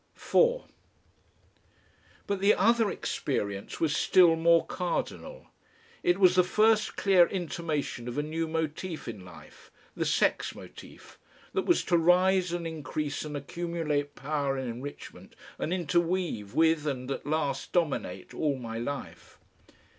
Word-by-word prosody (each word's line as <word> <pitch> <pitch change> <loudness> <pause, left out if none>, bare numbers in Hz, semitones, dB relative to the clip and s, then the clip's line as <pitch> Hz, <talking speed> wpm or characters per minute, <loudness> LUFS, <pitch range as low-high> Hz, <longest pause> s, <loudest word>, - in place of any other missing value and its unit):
4 - - +2 1.6
But 200 -1 -2
the 200 +2 +4
other 225 +1 +3
experience 100 - -3
was 155 -2 +1
still 175 -3 +5
more 165 0 +4
cardinal. 185 - -4 0.6
It 175 +2 +2
was 185 -2 +6
the 180 0 +5
first 215 +4 +2
clear 185 -4 +5
intimation 160 -8 -3
of 120 - -5
a 145 - +1
new 160 +2 -2
motif 160 +1 -4
in 105 -5 -7
life, 80 -4 -15 0.3
the - - -1
sex - - +1
motif, - - -13 0.3
that - - -1
was - - +3
to 175 - +2
rise 180 +1 +3
and 175 -1 -3
increase 155 -2 -4
and 150 -1 -5
accumulate 150 -1 -3
power 140 -1 -2
and 130 -1 -3
enrichment 130 +5 -9 0.2
and 160 - -2
interweave 170 - -1
with 160 -1 +3
and 130 -2 -3
at 135 - -5
last 155 -1 -1
dominate 170 -5 -2
all 145 -3 0
my 115 -2 -6
life. 140 +4 -6
160 Hz, 135 wpm, -28 LUFS, 145-180 Hz, 1.6 s, was